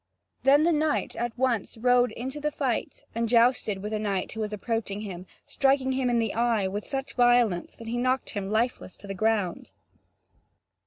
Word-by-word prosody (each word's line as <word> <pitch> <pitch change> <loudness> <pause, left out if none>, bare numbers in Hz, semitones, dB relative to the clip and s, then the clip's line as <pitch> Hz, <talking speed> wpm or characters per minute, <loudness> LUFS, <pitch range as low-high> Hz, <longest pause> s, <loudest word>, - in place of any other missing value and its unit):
Then 280 +3 +5
the 340 - +4
knight 310 -1 0
at 240 0 -3
once 240 -4 0
rode 245 +1 +3
into 265 +5 -5
the 300 +1 0
fight 270 -5 -2
and 230 0 -1
jousted 230 -4 +3
with 210 +1 -4
a 215 - 0
knight 200 -3 -2
who 220 - -7
was 215 -1 -2
approaching 210 -1 -3
him, 185 -3 -7 0.2
striking 270 -1 +2
him 260 -1 0
in 240 - +2
the 225 -3 0
eye 230 -4 +1
with 205 +2 -4
such 270 0 -4
violence 240 -7 +3
that 230 - -11
he 235 +2 -2
knocked 255 +1 0
him 200 -3 -4
lifeless 220 -3 -1
to - - -14
the 195 - -5
ground. 205 -3 0
235 Hz, 190 wpm, -27 LUFS, 210-255 Hz, 0.2 s, Then